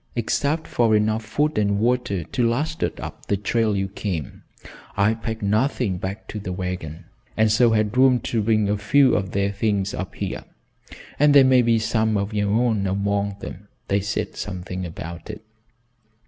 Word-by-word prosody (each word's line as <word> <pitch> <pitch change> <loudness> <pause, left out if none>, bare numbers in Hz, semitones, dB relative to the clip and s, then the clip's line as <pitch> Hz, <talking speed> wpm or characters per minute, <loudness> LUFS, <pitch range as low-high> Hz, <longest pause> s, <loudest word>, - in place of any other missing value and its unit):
"Except 145 +7 0
for 115 -2 +2
enough 110 +1 +1
food 150 +6 0
and 100 -1 +1
water 115 -5 0
to 120 - 0
last 155 +7 -2
us - - 0
up - - -8
the 100 - +1
trail 110 +1 0
you 95 0 -1
came, 95 - -5 0.6
I 100 +2 +3
packed 110 0 -5
nothing 105 -2 0
back 95 +4 -5
to 105 - -5
the 95 -2 -5
wagon, 90 -4 -5 0.3
and 110 -1 +3
so 120 +2 +4
had 110 0 +1
room 130 -1 +5
to 115 - -1
bring 110 -1 +2
a 105 +1 0
few 135 +5 +4
of 95 -2 -1
their 100 0 +1
things 100 -1 -1
up 95 - -5
here, - - -4 0.7
and 145 0 +5
there 140 - +9
may 130 -1 +5
be 115 -1 +3
some 110 -1 +1
of 100 +2 -2
your 105 -1 0
own 110 -2 +1
among 100 +1 -1
them 100 +3 -8 0.2
they 100 - +2
said 100 +1 -3
something 90 -1 -5
about 85 +2 -8
it. 110 0 -8
105 Hz, 180 wpm, -23 LUFS, 100-115 Hz, 0.7 s, there